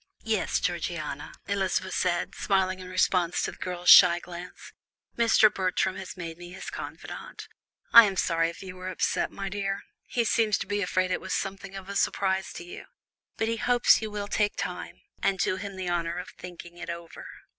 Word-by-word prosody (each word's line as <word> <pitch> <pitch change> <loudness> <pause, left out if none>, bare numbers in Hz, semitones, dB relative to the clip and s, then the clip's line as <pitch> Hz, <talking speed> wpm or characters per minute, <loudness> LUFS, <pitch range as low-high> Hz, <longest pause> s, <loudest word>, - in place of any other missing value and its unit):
"Yes, - - 0
Georgiana," - - -3
Elizabeth 195 -1 -1
said, 175 -1 0
smiling 190 -2 0
in 185 0 -9
response 185 -1 +1
to - - -1
the - - -14
girl's 180 -1 +2
shy 175 -1 +9
glance, 175 0 -10 0.4
"Mr. 225 -2 +5
Bertram 185 0 0
has 190 0 -8
made 165 -1 -6
me 175 0 -9
his 190 - -7
confidante. - - -8 0.5
I 235 -1 +12
am 195 -2 -1
sorry 165 -2 +2
if 170 - -10
you 185 -1 -8
were 185 0 -6
upset, 185 - 0
my 195 - -5
dear; 195 0 -3 0.2
he 240 - 0
seems 220 -2 +2
to - - -4
be 205 0 -1
afraid 185 0 0
it - - -1
was - - -2
something 195 0 -4
of 195 -1 -8
a 200 - -6
surprise 190 -1 0
to - - -7
you, 175 - -9 0.5
but 220 - 0
he 230 0 -1
hopes 245 0 +4
you 220 - -3
will 205 -1 -4
take 205 0 0
time, - - -5 0.2
and 195 - +1
do 185 - 0
him 200 0 -6
the 185 -2 -3
honour 170 0 -1
of 180 - -6
thinking 175 -1 -11
it 175 -1 -7
over." 170 -1 -7
185 Hz, 195 wpm, -27 LUFS, 175-200 Hz, 0.5 s, I